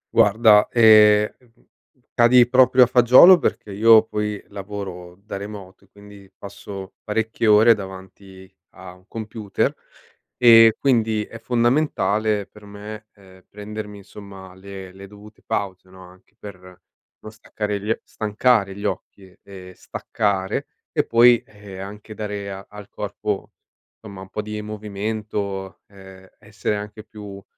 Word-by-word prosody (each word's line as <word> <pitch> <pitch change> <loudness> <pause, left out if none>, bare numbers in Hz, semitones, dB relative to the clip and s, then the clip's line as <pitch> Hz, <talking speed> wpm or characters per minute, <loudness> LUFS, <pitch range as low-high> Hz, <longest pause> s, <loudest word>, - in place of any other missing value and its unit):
Guarda, 110 -1 +5
ehm, 105 -2 +6
mhmm, 120 -1 -29 0.5
cadi 120 +1 +5
proprio 130 0 +5
a - - +5
fagiolo 125 +9 +7
perché 105 - -3
io 110 +2 +5
poi 105 -2 -4
lavoro 95 -3 -8
da 100 +1 -9
remoto 100 -1 -10
e - - -34
quindi 100 -1 -16
passo 100 -1 -10
parecchie 110 +1 -2
ore 110 +2 +6
davanti 95 -1 -11 0.3
a 95 -1 -11
un 90 0 -22
computer 110 -2 -3 0.6
e 115 -2 +7
quindi 110 -5 +1
è 115 - -12
fondamentale 115 -4 0
per 105 +2 -19
me, 105 +1 -10
ehm, 95 -2 -20
prendermi, 105 0 -8
insomma, 100 -2 -13
le 95 0 -11
le 100 +1 -12
dovute 105 +1 -16
pause, 95 -2 -4
no, 95 0 -15
anche 90 +3 -21
per 100 -4 -11
non 90 +3 -17
staccare 105 -1 -5
gli 105 - -6
oc 110 - -1
stancare 105 -2 0
gli 100 +1 -8
occhi 95 -2 -6
e 95 -2 -13
staccare 100 -3 -3 0.2
e - - 0
poi, 120 0 +5
ehm, 100 -2 -13
anche 105 +2 -10
dare 105 -2 -6
a 95 0 -9
al 105 -1 -12
corpo, 105 -1 -5 0.5
somma, 100 -3 -11
un 95 - -12
po' 105 - -5
di 105 0 -6
movimento, 105 -2 -5
ehm, 95 -1 -16
essere 105 0 -4
anche 105 +1 -8
più 105 -3 -11
105 Hz, 140 wpm, -21 LUFS, 95-110 Hz, 0.6 s, fagiolo